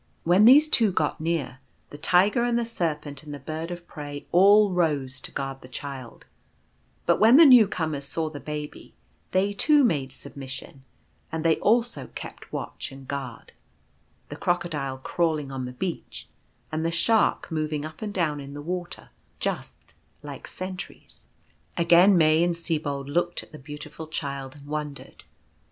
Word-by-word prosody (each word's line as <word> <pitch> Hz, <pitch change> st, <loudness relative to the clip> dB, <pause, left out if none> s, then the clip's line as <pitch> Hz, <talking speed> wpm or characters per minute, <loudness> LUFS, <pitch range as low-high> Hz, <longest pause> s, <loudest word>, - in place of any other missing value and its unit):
When 180 Hz, +5 st, +5 dB
these 285 Hz, +6 st, +8 dB
two 230 Hz, -9 st, +4 dB
got 155 Hz, -3 st, -1 dB
near, 155 Hz, -6 st, -2 dB, 0.3 s
the 145 Hz, -, -8 dB
Tiger 190 Hz, +8 st, +3 dB
and 240 Hz, -1 st, +1 dB
the 235 Hz, -, 0 dB
Serpent 155 Hz, -, -3 dB
and 150 Hz, -, -10 dB
the 145 Hz, -, -5 dB
Bird 160 Hz, +2 st, -5 dB
of 175 Hz, -1 st, -7 dB
Prey 145 Hz, -2 st, -8 dB
all 200 Hz, +3 st, +6 dB
rose 145 Hz, -7 st, 0 dB
to -, -, -8 dB
guard 135 Hz, 0 st, -5 dB
the -, -, -12 dB
Child; 130 Hz, -1 st, -8 dB, 0.8 s
but -, -, +3 dB
when 225 Hz, +5 st, +7 dB
the 330 Hz, -, +9 dB
new 250 Hz, -7 st, +8 dB
comers 155 Hz, -7 st, -3 dB
saw 160 Hz, +1 st, -2 dB
the 150 Hz, -2 st, -7 dB
Baby, 150 Hz, +2 st, -7 dB, 0.3 s
they 195 Hz, +2 st, +1 dB
too 295 Hz, +7 st, +4 dB
made 140 Hz, -, +1 dB
submission, 135 Hz, 0 st, -9 dB, 0.5 s
and 160 Hz, 0 st, -3 dB
they 160 Hz, -1 st, +4 dB
also 235 Hz, +3 st, +1 dB
kept -, -, -9 dB
watch -, -, -5 dB
and 135 Hz, -1 st, -12 dB
guard 135 Hz, -4 st, -6 dB, 0.4 s
— -, -, -39 dB
the -, -, -6 dB
Crocodile 150 Hz, -7 st, -1 dB
crawling 155 Hz, 0 st, -1 dB
on 130 Hz, -1 st, -4 dB
the 125 Hz, -, -6 dB
beach, 170 Hz, +7 st, -5 dB, 0.4 s
and 155 Hz, 0 st, -2 dB
the 165 Hz, -, +1 dB
Shark 210 Hz, +4 st, +2 dB
moving 155 Hz, -1 st, -2 dB
up 155 Hz, 0 st, -10 dB
and 215 Hz, -1 st, -3 dB
down 160 Hz, -7 st, 0 dB
in 140 Hz, 0 st, -9 dB
the 145 Hz, -, -6 dB
water 180 Hz, +2 st, -5 dB, 0.2 s
— -, -, -39 dB
just -, -, -8 dB, 0.3 s
like -, -, -8 dB
sentries. 185 Hz, 0 st, -8 dB, 0.5 s
Again 175 Hz, +3 st, +6 dB
May 155 Hz, 0 st, +4 dB
and 175 Hz, -1 st, +1 dB
Sibold 150 Hz, -5 st, -2 dB
looked 175 Hz, +4 st, -1 dB
at -, -, -18 dB
the 155 Hz, -, -11 dB
Beautiful 150 Hz, +2 st, -9 dB
Child 140 Hz, -3 st, -5 dB
and 145 Hz, -1 st, -14 dB
wondered. 150 Hz, -1 st, -6 dB
160 Hz, 170 wpm, -26 LUFS, 145-180 Hz, 0.8 s, the